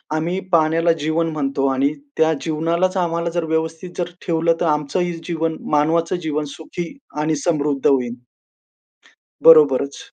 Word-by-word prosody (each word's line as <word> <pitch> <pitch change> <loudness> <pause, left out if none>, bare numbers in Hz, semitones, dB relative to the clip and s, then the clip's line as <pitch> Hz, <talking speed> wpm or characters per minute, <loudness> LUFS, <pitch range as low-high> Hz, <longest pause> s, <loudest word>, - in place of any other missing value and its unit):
आम्ही 170 +4 -1
पाण्याला 165 0 +3
जीवन 165 +2 0
म्हणतो 140 -2 -1
आणि 140 +2 +1 0.2
त्या 160 0 +3
जीवनालाच 170 +4 0
आम्हाला 170 -1 -1
जर 170 - 0
व्यवस्थित 160 +2 -2
जर 175 -1 -2 0.2
ठेवलं 165 0 +2
तर - - +2
आमचंही 175 +4 -2
जीवन 165 -2 -1 0.2
मानवाचं 160 +4 +2
जीवन 150 -1 -2
सुखी 165 +1 -6 0.3
आणि 155 +1 0
समृद्ध 145 -3 -1
होईल. 125 -4 +2 1.3
बरोबरच. 140 -4 +6
160 Hz, 130 wpm, -20 LUFS, 150-170 Hz, 1.3 s, बरोबरच